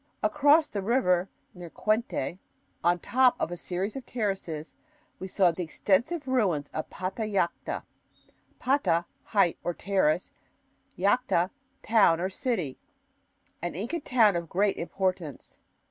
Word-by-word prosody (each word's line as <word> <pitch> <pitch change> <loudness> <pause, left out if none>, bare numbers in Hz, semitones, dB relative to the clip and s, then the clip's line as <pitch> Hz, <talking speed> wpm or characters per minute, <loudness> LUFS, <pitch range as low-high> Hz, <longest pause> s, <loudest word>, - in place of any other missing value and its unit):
Across 300 +2 +4
the 200 - -3
river, 190 -5 +2 0.2
near 175 -2 -9
Qquente, 215 - -1 0.4
on 175 +1 +4
top 255 +7 +3
of - - -1
a - - -3
series 185 +5 -3
of 270 - -5
terraces, 190 -10 -3 0.4
we 190 - -5
saw 185 -2 +3
the 170 - -5
extensive 235 - 0
ruins 190 - +1
of 155 - -4
Patallacta 190 -2 -2 0.7
(pata 190 -11 +1
= - - -42
height 180 -4 +3
or 175 - -2
terrace; 185 -4 +1 0.7
llacta 200 -3 +2 0.2
= 270 - -43
town 200 -7 +4
or 185 +2 -1
city), 185 - -2 0.8
an 175 -1 -3
Inca 235 - -3
town 225 -8 +3
of 170 -2 -3
great 200 +2 +1
importance. 180 -4 -3
190 Hz, 130 wpm, -28 LUFS, 175-235 Hz, 0.8 s, Across